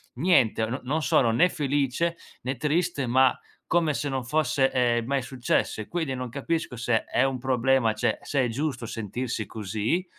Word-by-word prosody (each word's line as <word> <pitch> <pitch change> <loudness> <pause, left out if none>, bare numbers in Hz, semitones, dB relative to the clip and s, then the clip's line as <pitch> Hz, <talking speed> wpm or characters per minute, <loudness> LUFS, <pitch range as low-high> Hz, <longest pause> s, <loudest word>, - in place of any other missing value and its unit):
niente: 125 -7 +3
no 120 +5 -4
non 150 +5 -1
sono 120 -5 +3
né 140 +11 +4
felice, 145 +2 0 0.2
né 130 +1 -3
triste, 150 -1 0
ma, 130 +1 +4 0.3
come 165 -3 +2
se 145 +1 -2
non 130 -2 -3
fosse, 135 -1 +1
ehm, 120 -2 +1
mai 135 +2 0
successo. 125 -3 -1
E 110 - -5
quindi 160 -6 -2
non 125 -1 -4
capisco 140 +2 -2
se 120 -1 0
è 125 - +1
un 135 -1 0
problema, 130 -2 +2
cioè 110 - 0
se 140 -2 0
è - - 0
giusto 125 0 -3
sentirsi 115 0 -4
così, 110 - -2
130 Hz, 175 wpm, -26 LUFS, 120-145 Hz, 0.3 s, né